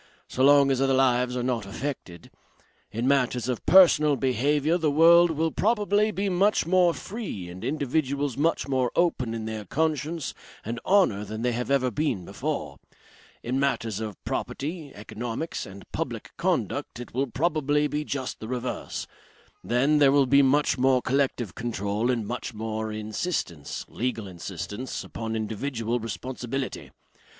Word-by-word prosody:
So 130 - -1
long 140 0 +6
as 135 0 +1
other 135 -1 +3
lives 125 -1 +2
are 125 - -1
not 120 -5 -1
affected. 100 - -6 0.6
In 115 +4 -1
matters 125 -3 +2
of 125 -3 -2
personal 155 -6 +7
behaviour 145 +6 +1
the 160 -2 +2
world 170 +3 +6
will 160 0 0
probably 210 0 +2
be 200 -1 -2
much 195 +1 +2
more 180 0 +4
free 195 - -6
and 90 +3 -9
individuals 140 0 -1
much 160 +2 +1
more 130 -3 +1
open 130 -10 +1
in 110 -1 -4
their 110 -1 -4
conscience 155 - -1 0.3
and 115 +2 -3
honour 185 - +4
than 110 +2 -5
they 125 - +2
have 120 +2 -3
ever 130 -2 +2
been 115 - -1
before. - - -4 0.6
In 125 +3 -1
matters 115 -6 0
of 110 -4 -5
property, 150 0 -4
economics 115 +8 -5
and 100 0 -11
public - - -4
conduct - - -1
it 120 - -9
will 135 +3 0
probably 150 +1 +1
be 150 +1 -2
just 135 -3 -4
the 110 - -7
reverse. 125 0 -4 0.6
Then, 135 +5 +2
there 140 -2 +6
will 140 -1 +4
be 140 +2 +5
much 140 0 +2
more 130 -1 +3
collective 130 -6 0
control 110 0 -2
and 120 -4 0
much 120 +1 -5
more 110 0 -3
insistence, 105 - -3
legal 120 -3 -3
insistence, 95 +6 -6
upon 115 0 -5
individual 115 +2 -2
responsibility. 125 +3 -5
130 Hz, 150 wpm, -26 LUFS, 115-150 Hz, 0.6 s, personal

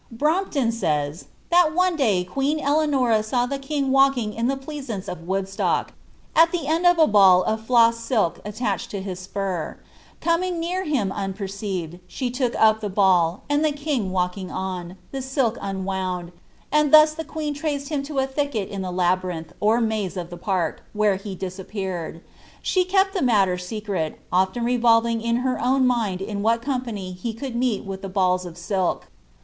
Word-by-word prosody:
iktMBpton 305 -2 +1
eaya. 150 +1 -1
" - - -35
That 340 -2 +4
one 365 0 +3
day 215 - +2
queen 275 +11 -1
Eleanora 280 -7 +2
saw 245 +3 0
the 275 +2 -3
king 275 -1 -1
walking 270 -5 +3
in 230 +2 -1
iha 270 +1 -1
pleoaance 270 -8 -6
of 170 -2 -7
Woodstock, 195 +1 -1 0.4
with 330 +1 +7
the 340 -5 -2
end 325 +4 +2
of 350 0 +5
a 320 - +6
ball 190 -6 +6
of 220 0 -1
floss 230 -1 +4
silk 230 -7 0
altarfwd 210 -1 -2
to 200 - -5
his 185 -2 -5
spur; 185 -3 -4 0.4
coming 345 +1 0
near 360 +3 -2
hira 255 - 0
un 195 -2 -3
perceived, 190 -4 -5
she 250 +5 -3
took 250 -1 -1
up 220 0 +5
tlte 205 -3 -4
ball, 180 -3 +3
anil 290 +1 +1
the 310 -1 +2
king 285 -9 -2
walking 185 0 -2
un, 185 -1 -5
the 270 - -4
sdk 265 -3 0
unwound, 190 -2 -3 0.4
and 300 -1 +3
thus 305 0 +8
the 320 +1 -5
queen 310 -2 -4
Incnl 290 -1 -3
him 295 -3 -1
to 280 +1 -6
a 265 - +3
thicket 265 -7 -2
in 195 -1 -5
the 185 - -3
labyrinth 180 -2 -1
or 215 +3 +3
maze 215 -5 -1
of 175 -1 -5
the - - -6
park, 175 -3 -2
where 210 -2 +2
he 195 0 -7
diappewd. 185 -2 -5 0.4
She 370 -1 +2
kept 385 +1 +2
the 380 - -1
mutter 200 -7 +3
secret, 185 -4 -4
often 190 +6 +1
revolving 230 -1 +3
in 230 0 0
her 255 -2 -1
own 260 +2 +3
umA 225 -7 0
'm 205 -2 -3
wbM 230 +2 +2
company 235 -9 -3
ho 230 - -2
could 255 -1 -5
meet 240 -4 0
with 195 0 -6
balls 185 -2 +1
of 170 -1 -10
silk. 185 +1 -1
220 Hz, 180 wpm, -23 LUFS, 190-275 Hz, 0.4 s, thus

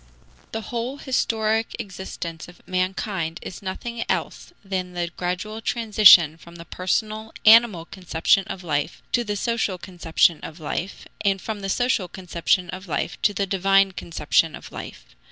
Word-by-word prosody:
The 225 - -3
whole 240 +4 -4
historic 225 -5 0
existence 180 -5 -7
of 175 - -17
mankind 185 -2 -2
is 185 - -8
nothing 230 +5 -4
else - - -2
than 185 -2 -3
the 175 -1 -3
gradual 185 +5 -3
transition 210 -9 +6
from 170 +1 -15
the 170 0 -10
personal, 215 +5 -2
animal 220 -6 +7
conception 180 +1 +1
of 190 - -7
life 150 -1 -2
to 240 - +2
the 205 -2 -3
social 220 -3 -1
conception 170 -2 +1
of 160 +2 -9
life, 170 +5 -4 0.2
and 195 -1 +2
from 215 +1 -5
the 195 -1 -4
social 245 -3 +1
conception 180 -1 -1
of 190 +1 -8
life 160 - -3
to 210 - +3
the 200 0 -1
divine 195 0 +3
conception 165 -2 0
of - - -11
life. - - -9
190 Hz, 155 wpm, -23 LUFS, 175-215 Hz, 0.2 s, animal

